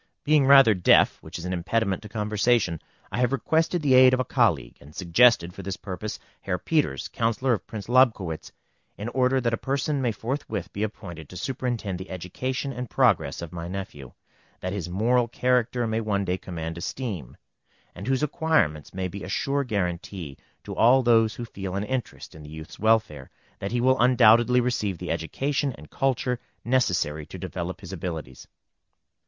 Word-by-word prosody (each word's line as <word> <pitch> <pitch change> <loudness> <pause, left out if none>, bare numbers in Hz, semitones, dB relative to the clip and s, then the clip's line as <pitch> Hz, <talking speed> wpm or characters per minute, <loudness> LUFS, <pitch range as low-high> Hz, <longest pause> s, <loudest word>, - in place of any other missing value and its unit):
Being 150 -2 +4
rather 135 -5 +8
deaf, 90 -3 +4
which - - -8
is 85 - -7
an 90 - -2
impediment 95 +2 0
to 105 - -10
conversation, 105 -4 +1 0.3
I - - -2
have 125 0 +2
requested 160 +4 +1
the 135 -3 +3
aid 130 0 +7
of - - -4
a 130 - 0
colleague, 85 - +1
and 75 +2 -15
suggested 90 0 +4
for 95 - -8
this 95 +1 -5
purpose 105 +1 -6 0.2
Herr 90 -2 -2
Peters, 145 - 0
Councillor 120 +3 0
of 105 - -4
Prince 105 -3 -7
Lobkowitz, 115 -10 +2 0.5
in 105 +3 -4
order 130 +1 +2
that 115 -2 0
a - - +1
person 140 +2 -1
may 120 -3 +1
forthwith 110 -1 -4
be 100 - -4
appointed 85 -7 -6
to 90 - -9
superintend 115 -5 -3
the 95 - -8
education 130 +10 -4
and 125 -1 -5
progress - - +2
of 85 - -8
my 85 -1 -5
nephew, 90 -9 -7 0.5
that 90 +1 -4
his 90 -4 -4
moral 115 +6 +2
character 125 0 +1
may 110 0 -1
one 100 -2 -1
day 90 0 -1
command 80 -2 -6
esteem, 95 - -5 0.6
and 95 +5 -8
whose 135 +2 +1
acquirements 150 - 0
may 95 -1 -2
be 100 +2 -8
a 95 - -7
sure 140 +7 0
guaranty 90 - -3 0.3
to - - -7
all 130 +3 +5
those 115 -2 +4
who 120 - -5
feel 95 -4 -6
an 100 - -1
interest 130 0 -4
in 80 - -12
the 75 - -11
youth's 80 +1 -10
welfare, 110 -11 +1 0.3
that 100 - -4
he 120 - 0
will 130 +2 +3
undoubtedly 120 0 +5
receive 105 -6 -1
the - - -4
education 140 - -1
and 75 - -14
culture 125 -2 0 0.3
necessary 90 - +1
to - - -10
develop 90 +2 -5
his 95 -1 -8
abilities. 80 -7 -6
110 Hz, 180 wpm, -25 LUFS, 90-125 Hz, 0.6 s, rather